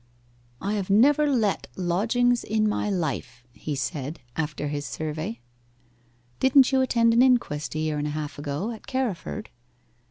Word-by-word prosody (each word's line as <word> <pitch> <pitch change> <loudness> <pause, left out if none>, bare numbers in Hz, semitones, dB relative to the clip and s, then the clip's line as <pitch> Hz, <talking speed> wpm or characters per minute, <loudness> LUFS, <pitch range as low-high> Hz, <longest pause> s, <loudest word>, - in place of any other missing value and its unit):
'I 200 +2 -1
have 200 -3 -2
never 285 +9 +5
let 225 -8 +1
lodgings 230 +7 +1
in 215 0 +1
my 210 0 0
life,' 140 - -3
he 150 - -4
said, 140 +3 -4 0.2
after 150 -2 -2
his 145 0 -3
survey. 155 -6 -4 1.0
'Didn't 265 0 +5
you 265 -1 +3
attend 230 -3 +3
an 235 - +5
inquest 240 - +2
a - - -1
year 155 -1 -1
and 145 - -1
a 150 +1 -3
half 150 -1 -5
ago, 145 +9 -3
at 225 - -10
Carriford? 215 -5 -3
195 Hz, 155 wpm, -25 LUFS, 150-240 Hz, 1.0 s, never